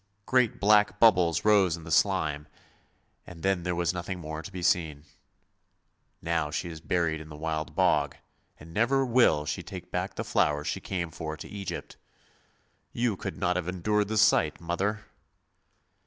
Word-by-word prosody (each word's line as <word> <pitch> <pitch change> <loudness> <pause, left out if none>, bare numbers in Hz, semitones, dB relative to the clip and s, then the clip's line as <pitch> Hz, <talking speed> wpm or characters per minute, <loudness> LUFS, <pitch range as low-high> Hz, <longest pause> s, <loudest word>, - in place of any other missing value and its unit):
Great 125 -3 +2
black 105 0 +4
bubbles 90 -8 +4
rose 100 -6 +4
in 85 - -11
the 80 - -8
slime, 75 -4 +1 0.8
and 85 -3 -11
then 95 -2 +1
there 90 0 -2
was 85 0 0
nothing 90 +1 -4
more 80 -1 -6
to 95 - -10
be 90 -2 -6
seen. 80 -4 0 1.2
Now 80 -3 0
she 85 +3 -3
is 80 -2 -9
buried 85 -2 0
in 80 - -11
the 75 - -9
Wild 80 0 -4
Bog, - - +2 0.4
and 80 +2 -13
never 135 +7 +2
will 120 - +3
she 75 - -3
take - - -9
back - - -3
the - - -3
flowers 75 0 +1
she - - -2
came 85 -4 -3
for 80 -2 -6
to - - -9
Egypt. 100 -2 -6 0.9
You 120 -3 0
could - - -6
not 90 0 0
have 90 -2 -3
endured 105 +3 0
the 110 +1 -2
sight, - - +3
mother! 100 +5 -2
90 Hz, 170 wpm, -28 LUFS, 80-105 Hz, 1.2 s, black